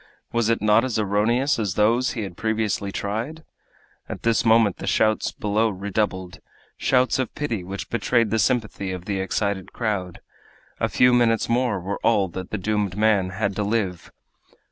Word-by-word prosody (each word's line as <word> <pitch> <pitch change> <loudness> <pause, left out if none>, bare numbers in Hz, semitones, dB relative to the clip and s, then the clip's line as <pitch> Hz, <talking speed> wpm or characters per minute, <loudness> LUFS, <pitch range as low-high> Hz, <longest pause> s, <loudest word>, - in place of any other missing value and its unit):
Was 115 -1 +1
it 115 -2 +1
not 105 +2 +4
as 130 -4 -1
erroneous 110 +6 +1
as 100 -6 -1
those 115 +5 +2
he 115 - -3
had 95 -3 -7
previously 110 -2 -1
tried? 115 +12 -4 0.7
At - - -7
this 115 -1 +2
moment 110 -3 +4
the - - -7
shouts 110 0 +2
below 105 +2 0
redoubled 95 -2 -3 0.4
shouts 130 0 +2
of 130 - -2
pity 120 -10 -3
which 95 +2 -6
betrayed 115 -1 +1
the 110 - +1
sympathy 105 -6 0
of 90 -1 -6
the 100 -1 -2
excited 95 0 -2
crowd. 100 -6 -3 0.6
A - - 0
few 125 0 +4
minutes 115 -2 +3
more 120 -4 +1
were 95 +3 -4
all 100 -5 +2
that 95 +2 -7
the 110 - -3
doomed 105 -1 -1
man 105 -3 +2
had 100 +1 -2
to 105 - 0
live! 100 -4 -2
105 Hz, 170 wpm, -23 LUFS, 100-115 Hz, 0.7 s, not